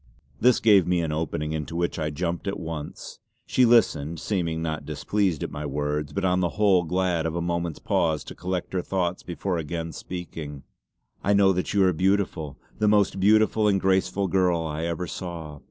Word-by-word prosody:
This 125 0 +4
gave 100 -5 +5
me 90 -1 +2
an 80 -2 -2
opening 75 -1 -2
into 80 +1 -4
which 85 0 -1
I 75 -1 -1
jumped 85 +5 -3
at 100 +1 -2
once. 80 -2 -7 0.3
She 130 - +3
listened, 85 -10 +3
seeming 85 -4 -1
not 80 -1 -3
displeased 100 -7 -1
at - - -4
my 75 +1 -5
words; 75 +1 -2
but 100 -1 -2
on 90 0 +2
the 90 -1 +1
whole 95 -4 +4
glad 90 -1 0
of 80 - -4
a - - -1
moment's 85 -1 -2
pause 80 -2 0
to - - -9
collect 90 +1 -4
her 90 - 0
thoughts 90 -1 -1
before 90 0 -3
again 80 +1 -4
speaking: 80 -4 -7 0.6
"I 100 - +3
know 100 -1 +5
that 90 +2 -2
you 100 - +5
are 95 -1 +4
beautiful; 90 -5 0 0.2
the 105 - +2
most 105 -2 +3
beautiful 110 +2 +4
and 100 -2 +3
graceful 95 +1 +1
girl 90 -2 +2
I 80 +1 -3
ever 85 +1 -2
saw. 80 -4 -7
85 Hz, 190 wpm, -25 LUFS, 80-95 Hz, 0.6 s, gave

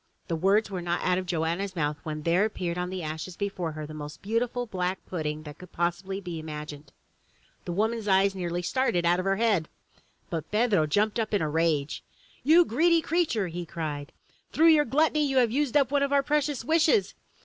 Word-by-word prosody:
The 165 - 0
words 200 +5 +2
were 185 -2 -3
not 175 0 -2
out 180 0 +2
of 185 - -6
Joanna's 175 +3 -1
mouth 150 -2 0
when 155 -1 -5
there 170 +4 +3
appeared 180 -5 -2
on 180 0 -3
the 185 -2 -5
ashes 160 +3 -5
before 185 -5 -3
her 155 0 -6
the 155 - -9
most 150 -1 -8
delicious 230 +4 0 0.2
black 185 0 -2
pudding 155 -3 -4
that 150 -1 -10
could 180 -1 -12
possibly 175 +3 -2
be 175 -4 -6
imagined! 150 -2 -8 0.7
The - - -4
woman's 220 +4 -1
eyes 195 0 +4
nearly 175 -2 -3
started 180 -6 +1
out 175 +1 +3
of 185 - -3
her 195 0 +2
head! 205 -7 +1 0.6
But 165 -2 -4
Pedro 210 -7 +2
jumped 210 +8 +1
up 220 -1 0
in 200 - +1
a - - 0
rage. 155 -3 0 0.4
"You 325 +6 +6
greedy 330 +7 +3
creature!" 310 - 0
he 175 +1 -5
cried. 150 -4 -5 0.4
"Through 330 +1 +5
your 305 -2 +5
gluttony 305 +4 +2
you 270 -2 0
have 240 -3 +4
used 285 +1 +1
up 275 -3 +2
one 285 -1 +2
of 280 0 0
our 280 -1 +3
precious 295 -3 0
wishes! 330 - +3
185 Hz, 205 wpm, -27 LUFS, 165-235 Hz, 0.7 s, You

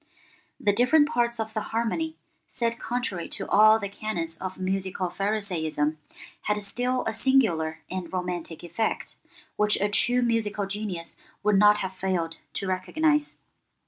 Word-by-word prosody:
The 205 - +2
different 275 +7 +5
parts 235 -5 0
of 220 0 -3
the 215 - -1
harmony, 235 +10 -2 0.3
set 235 -2 -1
contrary 235 -8 -3
to - - -4
all 215 +2 +7
the 205 -2 -4
canons 185 -5 -3
of 190 0 -5
musical 190 -1 -2
pharisaism, 165 -7 -1 0.4
had 210 0 0
still 250 +5 0
a 220 - -1
singular 215 -11 +2
and 185 -2 -5
romantic 180 -3 -4
effect, 175 +6 -2 0.4
which 210 0 +4
a 205 - +1
true 245 +4 +3
musical 215 -3 0
genius 195 -4 -4 0.3
would 210 -1 +4
not 210 0 +7
have 190 - -5
failed 185 -3 -2 0.2
to - - -1
recognize. 295 +11 +1
205 Hz, 145 wpm, -26 LUFS, 185-230 Hz, 0.4 s, all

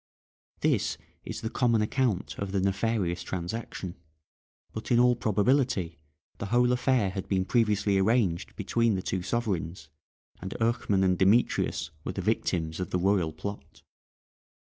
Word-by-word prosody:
This - - +1 0.3
is - - -6
the 110 - -3
common 115 -4 +2
account 110 -4 0
of 100 -1 -3
the 100 - +1
nefarious 95 -2 0
transaction, 90 0 -5 0.8
but 110 - -6
in 120 - +4
all 125 0 +5
probability 110 - +1 0.4
the 100 - -3
whole 125 +3 +3
affair 125 -5 +2
had 95 -1 -5
been 95 -1 +1
previously 105 -3 +2
arranged 95 -4 +1
between 115 -2 +1
the 95 - -3
two 95 - -2
sovereigns, 90 -7 -2 0.5
and 95 +1 -5
Eurchmann 110 -4 +1
and 90 -1 +2
Demetrius 100 +6 +2
were - - -4
the - - -3
victims 80 -2 -1
of 90 - -3
the - - 0
royal 90 -3 +2
plot. 100 +5 -8
100 Hz, 145 wpm, -28 LUFS, 95-115 Hz, 0.8 s, all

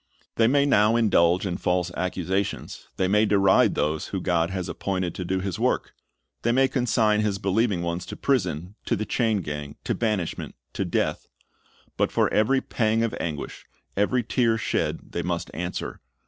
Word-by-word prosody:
They 115 - +3
may 140 +3 +4
now 110 -5 +4
indulge 90 -6 +3
in 90 -2 -2
false 90 -1 0
accusations, 95 +1 -2
they 95 - +2
may 105 +3 +4
deride 100 -2 +4
those 75 +1 -1
whom 95 -3 -4
God 85 -2 +1
has 95 -1 -3
appointed 90 -2 -2
to 90 - -5
do 95 +1 -1
His 95 -2 -3
work, - - 0 0.5
they 120 - +1
may 135 +2 +4
consign 115 -5 +2
His 105 -2 0
believing 100 -1 +1
ones 85 +1 -3
to - - -6
prison, 90 - -1
to - - +1
the 110 - -3
chain 110 -4 +1
gang, 75 -2 -6
to - - 0
banishment, 105 -7 -2 0.2
to - - -2
death; - - -1 0.7
but - - +1
for - - +1
every 130 +5 +3
pang 110 -1 +1
of 115 - -1
anguish, 75 -4 -5 0.3
every 120 +5 +2
tear 115 0 +2
shed, 110 - -2
they - - -2
must - - -3
answer. 90 +3 -4
100 Hz, 175 wpm, -25 LUFS, 90-110 Hz, 0.7 s, may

